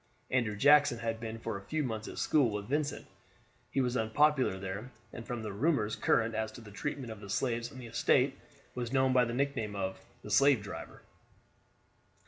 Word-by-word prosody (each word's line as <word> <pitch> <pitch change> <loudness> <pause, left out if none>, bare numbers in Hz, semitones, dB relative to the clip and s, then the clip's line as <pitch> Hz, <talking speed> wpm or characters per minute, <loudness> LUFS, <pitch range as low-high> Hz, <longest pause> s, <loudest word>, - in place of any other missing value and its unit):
Andrew 120 -5 +1
Jackson 145 +2 +5
had 115 -1 -3
been 115 0 -5
for 115 -2 -4
a 100 - -16
few 155 +5 -1
months 110 -4 -4
at - - -8
school 140 -6 +3
with 105 -1 -4
Vincent; 145 +3 -1 0.6
he 135 - +1
was 125 -1 0
unpopular 130 0 +2
there, 100 +5 -5 0.2
and 115 - -8
from 120 -2 -4
the 105 -2 -4
rumors 110 -2 +1
current 115 0 +2
as 110 0 -2
to - - -10
the 110 -3 -12
treatment 130 +2 -4
of 110 - -8
the 100 -1 -10
slaves 120 +1 -1
on 130 - -11
the 125 - -8
estate, 115 - +2 0.4
was 120 -2 -4
known 130 -1 +3
by 125 -1 +5
the 115 - -4
nickname 125 -6 -1
of 95 -1 -3 0.2
the - - -8
"slave 140 -5 +5
driver." 100 - -8
115 Hz, 195 wpm, -32 LUFS, 110-135 Hz, 0.6 s, Jackson